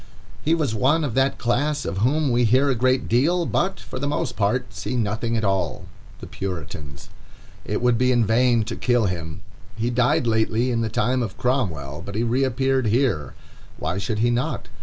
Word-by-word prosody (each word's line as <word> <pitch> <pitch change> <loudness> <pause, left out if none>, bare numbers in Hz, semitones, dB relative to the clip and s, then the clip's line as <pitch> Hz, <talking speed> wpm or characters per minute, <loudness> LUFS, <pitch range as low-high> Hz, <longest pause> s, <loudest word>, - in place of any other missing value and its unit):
He 160 +2 +3
was 150 -8 -1
one 135 +8 +2
of 140 -6 -2
that 135 +2 +2
class 145 +5 0
of 95 - -3
whom 140 +5 +2
we 120 +1 +3
hear 130 +5 +3
a - - 0
great 130 +2 +1
deal, 165 +9 +2
but, 185 +4 -1
for 130 - -7
the 140 - -2
most 140 -4 -2
part, 105 0 0
see 90 +8 -4
nothing 115 +1 -1
at 110 - -2
all—the 95 -4 -3
Puritans. 75 -6 -7 0.6
It - - -2
would 125 -2 +3
be 125 0 +3
in 120 -2 +3
vain 115 +1 +3
to - - -5
kill 120 -3 +1
him. 80 -4 -4 0.3
He 115 +2 -1
died 125 0 +2
lately 115 +2 +1
in 115 -1 0
the 110 - -1
time 125 +4 0
of 110 -6 -4
Cromwell, 85 - -1
but 100 +1 -7
he 110 - 0
reappeared 130 +1 +1
here. 110 - 0 0.4
Why 85 +4 -2
should 105 +3 -2
he 120 +3 +2
not? 120 +2 -2
120 Hz, 190 wpm, -23 LUFS, 105-130 Hz, 0.6 s, He